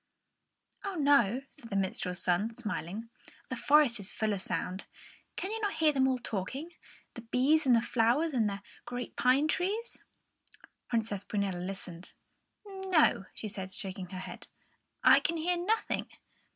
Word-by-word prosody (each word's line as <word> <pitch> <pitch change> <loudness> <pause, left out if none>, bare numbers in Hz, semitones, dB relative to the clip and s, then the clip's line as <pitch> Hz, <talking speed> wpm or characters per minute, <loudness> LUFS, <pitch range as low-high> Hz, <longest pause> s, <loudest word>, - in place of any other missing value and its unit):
"Oh, 395 -1 -3
no," 275 - +4
said 230 - -11
the 200 - -3
minstrel's 185 -1 -1
son, 200 +6 +1
smiling; 215 0 -5 0.4
"the 255 - -2
forest 275 -2 +4
is 200 0 -5
full 215 -1 0
of 195 - -3
sound. 185 0 -3 0.5
Can 385 - -3
you 450 0 -3
not 410 -1 -1
hear 315 -1 +4
them 265 -2 +3
all 260 -1 +2
talking, 250 - -4 0.4
the 235 - -8
bees 270 +6 +2
and 250 - +7
the 230 - +3
flowers 250 +9 +2
and 225 -5 +2
the 200 0 -6 0.2
great 245 0 -5
pine 260 +4 +4
trees?" 400 +8 -1 0.9
Princess 220 -4 -1
Prunella 200 -4 -1
listened. 180 -2 -6 0.5
"No," 380 - +2
she 220 - -5
said, 190 -2 -5
shaking 190 -1 -4
her 185 - -6
head, - - -8 0.6
"I - - +8
can 335 - 0
hear 350 +3 +1
nothing." 385 +6 0
235 Hz, 155 wpm, -31 LUFS, 200-305 Hz, 0.9 s, I